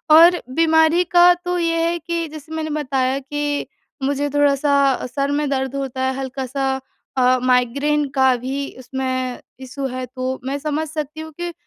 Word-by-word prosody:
और 340 +2 +7
बीमारी 320 +1 +4
का 350 0 +8
तो 355 0 -3
ये 330 -1 +1
है 345 - -1
कि 335 +1 -3
जैसे 310 0 -10
मैंने 315 -1 -3
बताया 265 -1 0
कि 290 +1 -2 0.4
मुझे 285 +1 0
थोड़ा-सा 280 -1 +3
सर 280 0 0
में 295 - -1
दर्द 265 -1 -1
होता 270 -2 -3
है, 260 0 +1
हल्का-सा 265 0 -2 0.5
अ, 255 0 +4
माइग्रेन 280 +4 +2
का 265 -1 +4
भी 270 +3 -4
उसमें 255 0 -3 0.2
इश्यू 270 +1 -5
है, 255 0 -4
तो 255 +1 -4
मैं 275 +2 -2
समझ 305 +2 -2
सकती 305 0 -5
हूँ 315 0 -8
कि 345 0 -3
280 Hz, 165 wpm, -20 LUFS, 260-315 Hz, 0.5 s, का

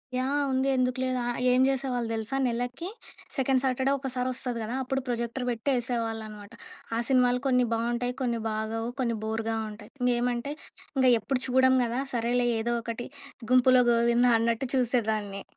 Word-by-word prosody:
Yeah! 275 +3 0
ఉంది 260 +1 +1
ఎందుకు 255 0 0
లేదు 255 0 0
ఆహ్, 240 - -2
ఏం 250 +1 +4
చేసేవాళ్ళు 255 -3 -1
తెలుసా? 225 +3 -3
నెలకి 245 +7 -3 0.5
సెకండ్ 265 -1 +2
సాటర్‌డే 265 +1 +1
ఒకసారి 260 -2 -3
వస్తది 245 -2 -3
కదా! 225 +3 -4
అప్పుడు 270 +1 -1
ప్రొజెక్టర్ 235 +1 -2
పెట్టి 235 +3 -2
ఎసేవాళ్ళునమాట. 225 -3 -4 0.5
ఆ - - +1
సినిమాలు 250 -2 +3
కొన్ని 250 -1 +3
బావుంటాయి. 240 +2 -1
కొన్ని 240 -2 0
బాగోవు. 220 +1 -2
కొన్ని 235 -3 0
బోర్‌గా 225 +1 -2 0.2
ఉంటాయి. 210 - -12
ఇంగేమంటే 245 +2 0 0.4
ఇంగా 260 -1 +5
ఎప్పుడు 250 +4 -2
చూడం 260 +1 +4
గదా! 240 +2 -1
సరేలే 240 +1 +1
ఏదో 240 +1 -1
ఒకటి 230 +1 -5 0.4
గుంపులో 255 0 +6
గోవిందా 235 +1 +4
అన్నట్టు 230 +2 0
చూసేదాన్ని. 220 -5 0
245 Hz, 150 wpm, -27 LUFS, 230-255 Hz, 0.5 s, గుంపులో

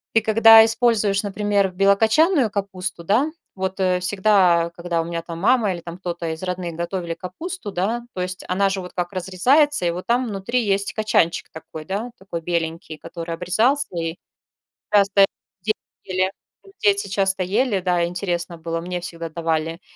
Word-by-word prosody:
ты 225 - +6
когда 225 +1 +8
используешь, 220 -3 +2
например, 205 -1 0
белокочанную 220 - +3
капусту, 190 -3 -4
да. 240 - +2 0.2
Вот 190 0 -3 0.2
всегда, 185 -3 +3
когда 170 -1 -2
у - - -5
меня 170 0 -4
там 165 -1 -7
мама 215 0 +3
или 175 - -7
там 170 0 -8
кто-то 170 -2 -4
из 160 +3 -9
родных 180 -2 -4
готовили 170 0 -3
капусту, 320 - -6
да, 220 +7 -2
то 185 - -4
есть 185 0 -4
она 195 +2 +2
же 190 -1 -2
вот 180 - -10
как 175 -1 -3
разрезается 190 - +2
и - - +1
вот 180 +2 -6
там 245 +2 +1
внутри 225 +4 -1
есть 200 -1 0
кочанчик 215 -6 +1
такой, 160 -1 -9
да, 210 +7 -4
такой 180 -3 -6
беленький, 165 -1 -3
который 170 0 -6
обрезался, 220 +12 +2
и 165 0 -3 0.8
часто 200 -1 +5 0.4
дети 215 - 0 0.3
ели, 185 +1 0 0.5
дети 200 -1 +2
часто 195 -1 +1
ели, 205 +1 0
да, 175 -1 +1
интересно 175 -1 -3
было 165 0 -4
мне 180 0 -4
всегда 170 -1 -6
давали. 165 +1 -2
190 Hz, 160 wpm, -22 LUFS, 170-210 Hz, 0.8 s, когда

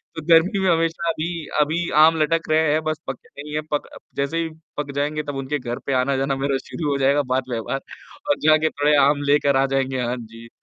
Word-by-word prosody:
तो 160 - -5
गर्मी 175 +5 +5
में 190 -1 +2
हमेशा 165 0 0
अभी 165 0 -3 0.2
अभी 165 +4 0
आम 160 +1 +6
लटक 165 +1 0
रहे 155 -1 +3
हैं 155 - +1
बस 155 0 -2
पके 135 - -7 0.2
नहीं 150 0 -9
है। 155 - 0
पक 145 - -1
अ, - - -13 0.2
जैसे 140 +4 -1
ही 165 - -4 0.3
पक 145 -1 -3
जाएँगे 150 +2 -1
तब 145 -1 -5
उनके 135 +2 -3
घर 120 -1 -5
पे 140 - -1
आना-जाना 135 +1 0
मेरा 135 0 0
शुरू 155 -3 -4
हो 140 - 0
जाएगा 140 +2 +3
बात 130 0 +1
व्यवहार 120 +3 -3 0.5
और 290 - +2
जा 155 0 +7
के 155 0 +1
थोड़े 145 +1 +2
आम 145 0 +1
लेकर 145 -1 +3
आ 135 - +3
जाएँगे। 135 -1 -1
हाँ 120 +1 -1
जी। 115 +1 -12
145 Hz, 230 wpm, -22 LUFS, 135-160 Hz, 0.5 s, जा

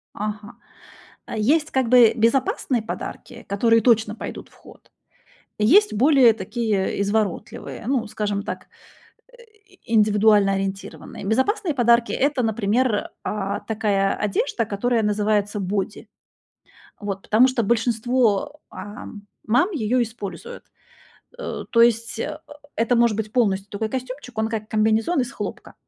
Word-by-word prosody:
Ага. 210 0 -5 0.7
Э, - - -6
есть 300 +8 +2
как 260 -3 0
бы 245 -2 +6
безопасные 240 +1 +1
подарки, - - -7
которые 230 +3 +3
точно 220 -2 +2
пойдут - - -8
в - - -26
ход. - - -18 0.7
И 210 - +2
есть 410 - +5
более 255 0 +5
такие 210 -1 -2
изворотливые, 210 +2 -3
ну, 250 -4 0
скажем 205 -1 -3
так, - - -6 0.7
э, - - -17 0.5
индивидуально 210 -2 +4
ориентированные. 195 +1 -5
Безопасные 315 - 0
подарки- 235 -2 +3
это, 280 -2 +1
например, 220 +1 0
э, 200 -1 -2
такая 205 -3 +1
одежда, 230 +4 -1
которая 225 +3 0
называется 210 0 0
боди. 195 +1 -3 0.9
Вот. 200 -2 -4
Потому 230 +4 +4
что 255 -3 0
большинство, 235 +3 +1
э, - - -11 0.7
мам 245 - +3
её 250 - 0
используют. 210 -6 -6 0.8
Э, - - -5
то 230 - +5
есть, 230 -1 +2
э, 305 +4 -4 0.4
это 230 +2 +2
может 235 -2 +3
быть 215 -1 -4
полностью 200 -5 0
такой 215 +2 -3
костюмчик, 255 -1 -6
он 220 0 +1
как 220 -1 -4
комбинезон 220 +9 +1
из 250 +1 -3
хлопка. - - -7
220 Hz, 130 wpm, -22 LUFS, 210-245 Hz, 0.9 s, бы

